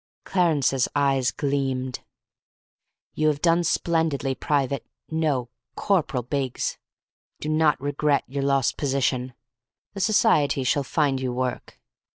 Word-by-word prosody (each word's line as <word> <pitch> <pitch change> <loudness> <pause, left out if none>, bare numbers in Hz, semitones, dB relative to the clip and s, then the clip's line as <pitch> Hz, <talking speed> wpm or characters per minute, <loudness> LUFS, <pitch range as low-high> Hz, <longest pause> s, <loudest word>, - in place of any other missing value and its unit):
Clarence's 150 -8 +2
eyes 135 -3 +2
gleamed. 135 -2 -2 1.1
"You 155 - +1
have 150 -2 +1
done 170 0 +4
splendidly, 160 -6 0
Private 140 -1 -1 0.3
no, 145 -7 0 0.2
Corporal 155 -10 0
Biggs. 130 0 -2 0.6
Do 150 - -4
not 155 -1 +3
regret 145 +1 +1
your 140 +2 -4
lost 135 -2 +1
position. 130 -3 -1 0.6
The 200 - -6
society 190 - +3
shall 140 +3 +2
find 135 -1 0
you 130 -1 -1
work. 125 0 -4
140 Hz, 115 wpm, -24 LUFS, 130-155 Hz, 1.1 s, done